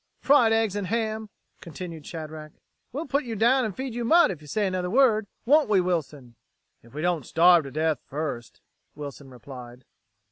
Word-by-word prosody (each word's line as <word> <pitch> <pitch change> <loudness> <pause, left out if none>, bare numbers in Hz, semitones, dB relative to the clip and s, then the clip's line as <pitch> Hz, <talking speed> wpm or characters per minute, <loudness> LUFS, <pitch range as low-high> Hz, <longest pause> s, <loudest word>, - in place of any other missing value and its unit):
"Fried 270 -5 +4
eggs 225 -3 +1
and 205 -2 -3
ham," 220 0 -2 0.3
continued 165 -1 -9
Shadrack. 155 -2 -8 0.4
"We'll 295 +6 -4
put 280 +1 0
you 235 -3 -5
down 240 +4 +3
and 205 -4 -4
feed 260 -2 -4
you 240 +1 -3
mud, 335 - +5
if 165 -5 -8
you 150 - -14
say 210 +7 -1
another 185 -1 -2
word. 220 -2 +3 0.2
Won't 290 +1 +4
we, 205 -3 +4
Wilson!" 150 -9 -3 0.4
"If 120 +4 -19
we 155 - -4
don't 175 -4 0
starve 170 +1 +5
to 135 - -8
death 155 0 0
first," 140 -5 -5 0.3
Wilson 140 -2 -9
replied. 125 -1 -11
180 Hz, 180 wpm, -25 LUFS, 150-225 Hz, 0.4 s, mud